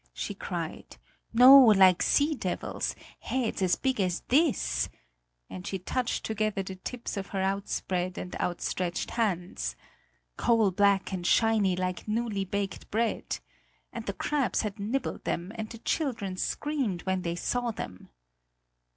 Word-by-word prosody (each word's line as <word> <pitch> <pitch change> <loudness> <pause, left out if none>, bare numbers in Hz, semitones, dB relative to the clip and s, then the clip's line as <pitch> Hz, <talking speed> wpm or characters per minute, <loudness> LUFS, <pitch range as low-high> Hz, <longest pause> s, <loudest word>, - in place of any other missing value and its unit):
she - - -3
cried; - - -6 0.3
"no, 255 +4 +10
like 190 -6 +6
sea 300 +2 +3
devils! - - -3 0.2
Heads 250 -6 -2
as 185 -2 +3
big 260 -5 0
as 180 -2 0
this," 295 +1 +2 0.6
and 185 +1 -8
she 195 - -2
touched 240 +7 -2
together 215 -2 -1
the 190 0 -7
tips 235 +3 -5
of 195 - -4
her 195 - -3
outspread 190 -2 -1
and 180 - -5
outstretched 175 0 -2
hands, 175 - -1 0.6
"coal 225 -4 +3
black 200 +1 +2
and 175 -2 -2
shiny, 220 -5 +3
like 185 +2 -3
newly 215 -2 -1
baked 195 0 -4
bread! 225 +1 -1 0.6
And 230 -1 -6
the 200 - -1
crabs 280 +2 0
had 210 0 -4
nibbled 230 +7 -2
them, 175 +3 -2
and 220 -1 -5
the 230 - -8
children 230 - -2
screamed 255 -4 -2
when 190 -1 0
they 170 -1 -2
saw 245 +7 -1
them." 95 - -7
200 Hz, 140 wpm, -28 LUFS, 185-235 Hz, 0.6 s, no